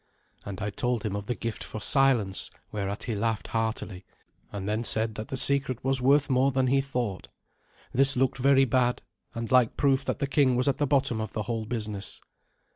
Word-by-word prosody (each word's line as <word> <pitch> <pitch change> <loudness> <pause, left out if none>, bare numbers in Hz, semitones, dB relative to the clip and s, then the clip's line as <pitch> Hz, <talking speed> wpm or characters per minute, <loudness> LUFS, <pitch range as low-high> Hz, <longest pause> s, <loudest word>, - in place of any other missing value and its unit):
And 100 +1 -6
I 105 -1 -2
told 120 +1 -2
him 105 -2 -2
of 100 0 -5
the 120 - -1
gift 115 -2 -5
for 110 - -7
silence, 120 -6 +1 0.2
whereat 100 -1 -4
he 115 - -3
laughed 110 +1 -2
heartily, 110 -4 -3 0.5
and 100 -1 -5
then 110 +2 -1
said 110 -1 +2
that 110 0 -6
the 135 - -4
secret 135 -2 +2
was 135 -1 0
more 140 +3 +5 0.3
worth 135 - +1
than 130 -1 +2
he 135 +2 +2
thought. 125 -8 -4 0.7
This 135 +1 +5
looked 135 +1 +1
very 135 +1 +4
bad, 125 0 +1 0.3
and 115 -1 -5
like 125 -3 +3
proof 135 -1 +2
that - - -2
the - - -1
king 135 -2 +2
was 125 +2 0
at 140 - +1
the 145 -2 0
bottom 135 -5 +1
of 110 -1 -5
the 110 - -2
whole 115 -1 -3
business. 105 -4 -4
120 Hz, 200 wpm, -27 LUFS, 110-135 Hz, 0.7 s, more